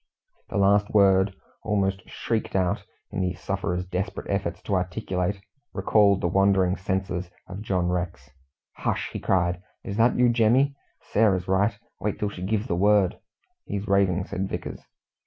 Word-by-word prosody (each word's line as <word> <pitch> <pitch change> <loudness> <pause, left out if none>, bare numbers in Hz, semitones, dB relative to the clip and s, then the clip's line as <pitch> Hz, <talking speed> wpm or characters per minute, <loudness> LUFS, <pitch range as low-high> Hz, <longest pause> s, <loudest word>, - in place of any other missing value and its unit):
The - - -3
last 100 +1 +4
word, 95 -1 +5 0.3
almost 95 -3 -1
shrieked 115 -4 -2
out, 95 -2 +1 0.3
in - - -2
the 90 -1 -1
sufferer's 90 -1 -2
desperate 90 +1 -4
efforts 95 -4 -1
to 100 - -3
articulate, 90 +1 -1 0.3
recalled 100 -3 +3
the - - +1
wandering 95 0 +3
senses 95 -2 -2 0.2
of 100 +1 -8
John 95 -5 0
Rex. 85 -7 -3 0.5
"Hush!" - - -2
he - - -3
cried. 90 -1 +1 0.2
"Is 100 - -5
that 115 +2 +4
you, 125 0 +5
Jemmy? 120 +5 +3 0.3
Sarah's 95 -4 +2
right. 100 +3 +2 0.2
Wait 105 - -2
till 105 - -1
she 95 - -9
gives 105 +3 -1
the 85 - -1
word." 100 0 +3 0.5
"He's 100 +1 -4
raving," 95 -2 +2
said 95 -1 -3
Vickers. - - -5
95 Hz, 155 wpm, -25 LUFS, 90-105 Hz, 0.5 s, word